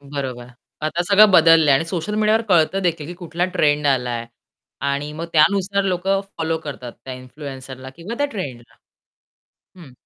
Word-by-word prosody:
बरोबर. 135 -4 -6 0.4
आता 155 +3 -1
सगळं 205 +1 +7
बदललंय 165 -4 +6
आणि 150 +4 +1
सोशल 175 +4 -4
मीडियावर 215 +1 +2
कळत 175 +1 +3
देखील 165 -4 -1
की 175 - -7
कुठला 175 0 -3
ट्रेंड 145 -1 +2
आलाय. 125 -4 0 0.5
आणि 140 +1 -2
मग 165 +2 -5
त्यानुसार 195 +5 +3
लोक 185 -1 -2
फॉलो 195 -5 -1
करतात 135 -6 -8
त्या 130 - -6
इन्फ्लुएन्सरला 130 0 -9
किंवा 175 +7 -6
त्या 285 - +2
ट्रेंडला. 125 - -7 1.0
हं. 155 -8 -13
160 Hz, 150 wpm, -21 LUFS, 135-185 Hz, 1.0 s, सगळं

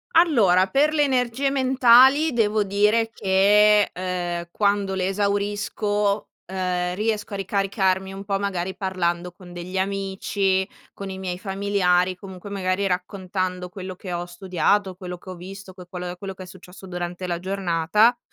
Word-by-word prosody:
Allora, 220 - +5
per 295 +5 +2
le 295 -1 +3
energie 260 0 +1
mentali 265 +3 +5
devo 215 -2 +2
dire 210 +3 +2
che, 205 +1 +4
ehm, 175 -1 -3
quando 200 -2 +1
le 185 0 0
esaurisco, 205 +1 -1 0.2
ehm, 180 -1 -2
riesco 210 -1 -2
a - - -2
ricaricarmi 195 -1 0
un 195 +1 -7
po' 195 -1 -1
magari 190 -2 -2
parlando 180 -2 -2
con 180 -1 -14
degli 180 +2 -6
amici, 195 0 0 0.3
con 195 -1 -7
i 190 - -7
miei 180 -2 -4
familiari, 190 -2 +1
comunque, 190 +1 -10
magari 195 0 -1
raccontando 185 0 -3
quello 185 0 -7
che 185 0 -8
ho 175 0 -3
studiato, 185 +2 0
quello 180 -1 -7
che 185 - -13
ho 185 - -6
visto, 190 +2 -10
que 180 -1 -12
quello 180 0 -6
quello 195 0 -6
che 185 - -10
è - - -10
successo 185 +1 -13
durante 175 0 -5
la 175 -1 -1
giornata. 190 +4 +2
190 Hz, 155 wpm, -23 LUFS, 180-205 Hz, 0.3 s, Allora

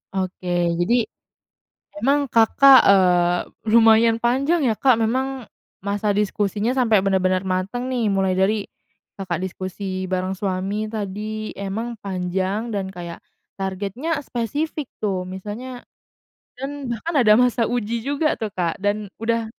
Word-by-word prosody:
Oke, 180 -2 -1
jadi 235 +7 +2 1.0
memang 280 0 +1
Kakak, 260 +4 +7
eee, 180 -2 +4 0.3
lumayan 225 0 +5
panjang, 275 +8 +2
ya, 225 -5 +1
Kak, 260 -2 +5
memang 260 +2 -2 0.3
masa 205 +1 -1
diskusinya 205 +1 0
sampai 225 -6 +3
benar-benar 185 -1 +1
mateng, 195 +7 -2
nih, 245 -3 0
mulai 195 -2 +1
dari 205 +2 +2 0.6
Kakak 180 -3 -3
diskusi 185 0 -4
barang 185 0 -2
suami 195 +2 -2
tadi, 215 0 -4
emang 220 +4 -4
panjang 190 +3 -2
dan 200 -3 -2
kayak 170 -1 -7 0.4
targetnya 200 - -3
spesifik, 290 +5 -3 0.2
tuh, 190 -3 -1
misalnya 210 +7 -7 0.8
dan 275 0 -5
bahkan 235 +9 -4
ada 215 -3 +6
masa 245 -2 +2
uji 235 -1 -2
juga, 285 +5 0
tuh, 220 - -4
Kak, 175 -1 -2
dan 205 0 -2
udah 230 0 0
210 Hz, 125 wpm, -22 LUFS, 190-240 Hz, 1.0 s, Kakak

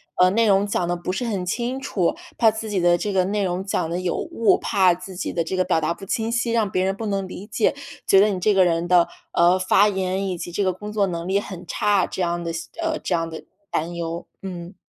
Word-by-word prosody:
呃， 180 0 +5
内 225 +3 +2
容 195 0 +4
讲 180 -4 -1
得 175 - 0
不 175 +1 -4
是 245 +6 -2
很 195 -6 -2
清 240 +7 -2
楚、 190 -10 0 0.2
怕 225 -2 +5
自 220 0 -5
己 200 -3 0
的 175 0 +4
这 205 +4 -2
个 185 -1 +2
内 205 +1 0
容 185 +1 -2
讲 175 -4 -1
得 175 +2 -2
有 180 -2 -1
误、 275 -10 +2
怕 185 -3 +3
自 185 +1 -9
己 - - -3
的 170 - 0
这 185 +3 -3
个 185 - +2
表 160 - +1
达 155 +2 0
不 195 - -11
清 225 +2 -1
晰， 235 0 0
让 220 -3 +2
别 185 0 +1
人 195 0 0
不 225 - -5
能 195 -2 -1
理 185 +2 -8
解， 225 +3 +1 0.3
觉 195 0 +6
得 210 - +5
你 190 -2 -2
这 210 +3 +3
个 190 - +5
人 170 -1 +1
的， 175 -1 +4 0.2
呃， 175 +2 +4
发 195 +3 +4
言 190 0 -1
以 180 - -3
及 175 +1 -7
这 205 - 0
个 185 - +2
工 210 +4 -8
作 205 -2 +2
能 170 -1 -4
力 195 +1 +2
很 185 -3 -8
差， 205 -3 +2
这 190 - -5
样 175 0 0
的， 170 -1 -3 0.3
呃， 325 -1 0
这 - - -1
样 165 -1 0
的 160 - -8 0.3
担 165 +3 -2
忧。 170 0 -4 0.2
嗯。 180 -1 -7
185 Hz, 280 characters per minute, -23 LUFS, 175-205 Hz, 0.3 s, 觉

